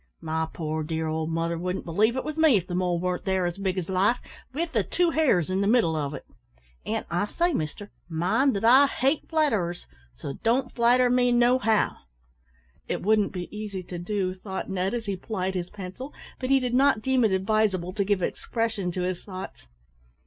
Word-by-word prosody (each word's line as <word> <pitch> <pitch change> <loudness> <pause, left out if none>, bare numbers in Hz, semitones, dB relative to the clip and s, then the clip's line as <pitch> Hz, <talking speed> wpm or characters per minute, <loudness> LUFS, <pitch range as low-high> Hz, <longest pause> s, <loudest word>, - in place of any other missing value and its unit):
My 160 0 -2
poor 155 -1 -3
dear 160 +1 -2
old 160 0 -2
mother 165 0 -1
wouldn't 180 +2 -3
believe 210 +8 +2
it - - -1
was 305 - -4
me 310 -8 +6
if 180 - -2
the 180 - -6
mole 180 -1 0
warn't 180 0 -2
there 190 -1 0
as 175 +2 -3
big 190 -1 -1
as 175 -3 -2
life, 195 +6 +2 0.3
with 325 +5 -2
the - - +2
two 350 -2 +1
hairs 230 - +2
in 190 +1 +1
the 200 - +1
middle 215 -8 +3
of 145 -1 -2
it. - - -9 0.6
An' 220 +1 -2
I 175 +5 0
say, 345 +8 0
mister, 180 - -4 0.2
mind 195 - +2
that 200 - -1
I 265 +4 +7
hate 275 +2 0
flatterers, 220 - 0 0.3
so 135 - -6
don't 250 +3 +1
flatter 245 +1 +4
me 250 0 +3
no 240 +1 +4
how." 220 -3 +1 0.9
"It - - -3
wouldn't 210 0 +3
be 180 -2 -5
easy 205 -3 -5
to 175 0 -7
do 185 0 -1
so," 185 - -18
thought 190 0 -5
Ned, 190 +3 -1
as 230 -2 -4
he 200 -1 -2
plied 190 -1 -3
his 180 -1 -3
pencil, 200 +8 -8 0.2
but 255 - -3
he 270 0 +5
did 250 -2 -2
not 255 -4 +3
deem 260 -2 +2
it 220 - +3
advisable 190 -2 +1
to 200 0 0
give 195 -2 0
expression 225 -5 -2
to 180 - -2
his 180 -1 -3
thoughts. 185 - -8
195 Hz, 205 wpm, -26 LUFS, 180-240 Hz, 0.9 s, I